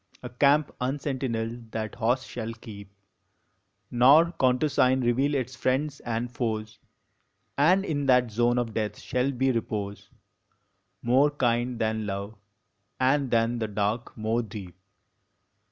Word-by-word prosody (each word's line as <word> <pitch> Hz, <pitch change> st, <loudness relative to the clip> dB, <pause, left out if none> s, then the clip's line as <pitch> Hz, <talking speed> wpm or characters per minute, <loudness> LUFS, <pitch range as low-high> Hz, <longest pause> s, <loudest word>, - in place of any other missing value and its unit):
A 125 Hz, -, -5 dB
camp 140 Hz, +4 st, +3 dB
unsentineled 125 Hz, -4 st, -3 dB
that 110 Hz, -1 st, -3 dB
host 125 Hz, +3 st, 0 dB
shall 115 Hz, -2 st, -5 dB
keep, 100 Hz, -4 st, -11 dB, 1.0 s
Nor 140 Hz, +8 st, +6 dB
countersign 130 Hz, 0 st, +3 dB
reveal 130 Hz, +4 st, +1 dB
its 130 Hz, -2 st, -2 dB
friends 140 Hz, +4 st, -1 dB
and 120 Hz, +1 st, -3 dB
foes; 110 Hz, -5 st, -3 dB, 0.8 s
And 180 Hz, +7 st, +4 dB
in 145 Hz, -5 st, -2 dB
that 125 Hz, -3 st, +4 dB
zone 120 Hz, +2 st, +2 dB
of 120 Hz, -2 st, -1 dB
death 105 Hz, -1 st, -2 dB
shall 125 Hz, +2 st, -1 dB
be 130 Hz, 0 st, +1 dB
repose 105 Hz, -3 st, -4 dB, 0.9 s
More 130 Hz, +5 st, +4 dB
kind 120 Hz, -3 st, 0 dB
than 110 Hz, -1 st, -1 dB
love, 100 Hz, +2 st, -4 dB, 0.7 s
and 135 Hz, +1 st, +2 dB
than 115 Hz, +1 st, +1 dB
the 110 Hz, -, -1 dB
dark 105 Hz, +4 st, -2 dB
more 110 Hz, +2 st, 0 dB
deep. 100 Hz, -5 st, -9 dB
120 Hz, 125 wpm, -27 LUFS, 110-130 Hz, 1.0 s, Nor